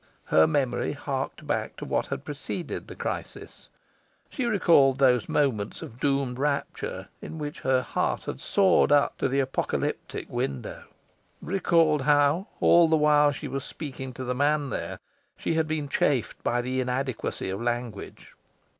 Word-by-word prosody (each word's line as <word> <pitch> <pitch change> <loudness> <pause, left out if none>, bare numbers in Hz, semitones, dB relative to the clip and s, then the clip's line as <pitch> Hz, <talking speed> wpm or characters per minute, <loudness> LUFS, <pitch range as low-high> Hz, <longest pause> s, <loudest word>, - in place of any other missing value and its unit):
Her 80 0 +5
memory 140 -2 0
harked 140 +1 -4
back 145 - -2
to - - -7
what - - -1
had - - -5
preceded - - -5
the - - -9
crisis. - - -6 0.6
She 260 - -2
recalled 165 - +4
those 125 -4 +3
moments 120 -9 0
of 115 - -10
doomed 135 -3 0
rapture 140 0 -2
in 160 - -7
which 150 -1 -5
her 130 -1 +2
heart - - -1
had - - -5
soared 195 -6 +3
up 145 -1 +3
to - - +2
the 135 +1 0
apocalyptic 135 -1 -2
window 70 -2 -4 0.5
recalled 165 -5 +2
how, 145 - +3
all 170 -1 +6
the 160 - +3
while 150 -1 +5
she 140 - -6
was 135 -1 -4
speaking 135 -4 -7
to 130 - -6
the 125 0 -1
man 145 +1 +1
there, - - -4 0.4
she - - -1
had 160 -1 +1
been 155 -2 -2
chafed 135 -2 0
by 120 0 +1
the 130 +1 -1
inadequacy 125 -6 -2
of 95 +3 -4
language. 120 -3 -4
140 Hz, 155 wpm, -27 LUFS, 130-150 Hz, 0.6 s, all